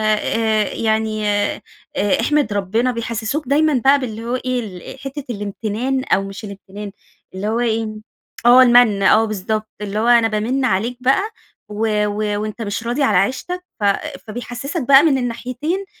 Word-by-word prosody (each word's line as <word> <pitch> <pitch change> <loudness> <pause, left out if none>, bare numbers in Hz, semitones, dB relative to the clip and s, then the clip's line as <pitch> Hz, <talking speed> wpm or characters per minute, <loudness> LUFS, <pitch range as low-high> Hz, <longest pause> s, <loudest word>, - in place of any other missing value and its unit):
آآ 220 0 0
يعني، 220 -1 0
آآ 205 0 0 0.6
أحمِد 295 -7 +1
ربنا." 210 +5 0
بيحسسوك 230 +4 -3
دايمًا 305 +3 +3
بقى 280 +1 +6
باللي 225 -4 -5
هو 240 +2 -2
إيه، 255 0 -1 0.3
ال - - -15
حتّة 275 +2 -6
الامتنان، 220 +4 -2
أو 195 - +1
مش 195 +2 -8
الامتنان 200 0 -9 0.4
اللي 190 +2 -4
هو 225 +2 0
إيه؟ 225 -2 0 0.6
آه 245 +2 +8
المَّن، 240 -5 +5
آه 215 +3 +5
بالضبط، 215 +1 -3
اللي 205 0 -3
هو 225 - 0
أنا 235 -2 +5
بامِّن 225 +5 -1
عليك 235 +2 0
بقى 265 +9 +3 0.5
و 210 0 0
و 210 0 -1
وأنت 215 +2 -5
مش 210 0 -3
راضي 240 +5 -1
على - - +3
عيشتك، 360 +7 -1 0.2
ف - - -5 0.4
فبيحسسك 245 - -5
بقى 275 +1 +8
مِن 300 -5 +3
الناحيتين 255 +9 -3
230 Hz, 160 wpm, -19 LUFS, 210-255 Hz, 0.6 s, آه